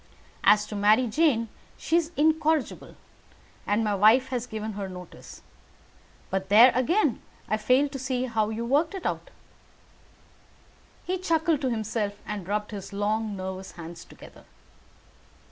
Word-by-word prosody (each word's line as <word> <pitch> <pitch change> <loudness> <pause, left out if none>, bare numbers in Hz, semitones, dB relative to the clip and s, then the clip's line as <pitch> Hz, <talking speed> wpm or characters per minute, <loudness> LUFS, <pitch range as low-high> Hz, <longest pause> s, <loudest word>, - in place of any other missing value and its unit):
As 210 0 +5
to 210 - -7
Mary 210 +5 +4
Jane, 240 -2 +1 0.3
she 325 - -1
is 335 -1 +1
incorrigible, 315 0 +1 0.7
and 210 +2 +1
my 210 -1 0
wife 220 +6 +4
has 250 -2 -3
given 220 -1 -5
her 200 -1 -5
notice; 180 -1 -11 0.9
but 190 0 -2
there 230 +5 +8
again 290 - +1 0.3
I 215 - 0
fail 255 +6 +3
to 275 -1 -7
see 255 -1 -2
how 220 -3 0
you 225 +1 -4
work 300 +9 +1
it 380 - -7
out." - - -3 1.8
He 370 +1 -2
chuckled 325 -4 +1
to 260 - 0
himself 215 -2 -2
and 205 -4 -6
rubbed 210 +1 -2
his 200 -2 -7
long 210 +1 -1
nervous 190 0 -6
hands 170 0 -9
together. - - -15
225 Hz, 145 wpm, -26 LUFS, 205-275 Hz, 1.8 s, there